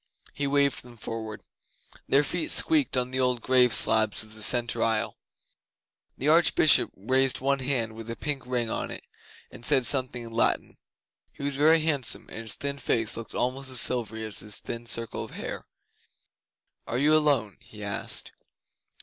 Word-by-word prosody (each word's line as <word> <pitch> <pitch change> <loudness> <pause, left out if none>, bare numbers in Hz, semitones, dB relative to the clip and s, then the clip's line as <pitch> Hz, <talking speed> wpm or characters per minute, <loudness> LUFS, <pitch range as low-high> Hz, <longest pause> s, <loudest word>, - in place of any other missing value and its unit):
He 140 - -3
waved 140 0 +1
them 120 -1 -15
forward. 110 -1 -7 0.6
Their 140 +2 +4
feet 165 +3 -3
squeaked 300 - +2
on 125 0 -1
the 130 - -1
old 125 -1 +1
grave 125 -1 +4
slabs 110 -1 +3
in 110 - -17
the 110 0 -10
centre 120 +1 +3
aisle. 110 -1 -1 1.0
The 140 - -3
Archbishop 160 -1 +5
raised 130 +6 0
one 135 +1 0
hand 125 -4 -1
with 115 +1 -10
a 115 - -4
pink 140 -3 -4
ring 125 -2 -1
on - - -3
it, - - -8 0.5
and - - -13
said 135 -2 +3
something 130 -3 +2
in 115 - -10
Latin. 115 - -1 0.5
He - - -11
was 140 -1 -2
very 155 +3 +4
handsome, 145 -7 -1
and - - -9
his 115 -2 -3
thin 140 0 -5
face 115 -3 0
looked 115 0 -9
almost 130 +2 -2
as 130 -2 +1
silvery 110 -3 +2
as 110 -2 -6
his 105 -1 -2
thin 120 0 -6
circle 115 -1 0
of - - -10
hair. - - -7 1.2
'Are 120 - -2
you 150 +4 +3
alone?' 140 -9 +1
he 110 -3 -12
asked. 100 -1 -3
125 Hz, 175 wpm, -26 LUFS, 115-140 Hz, 1.2 s, Archbishop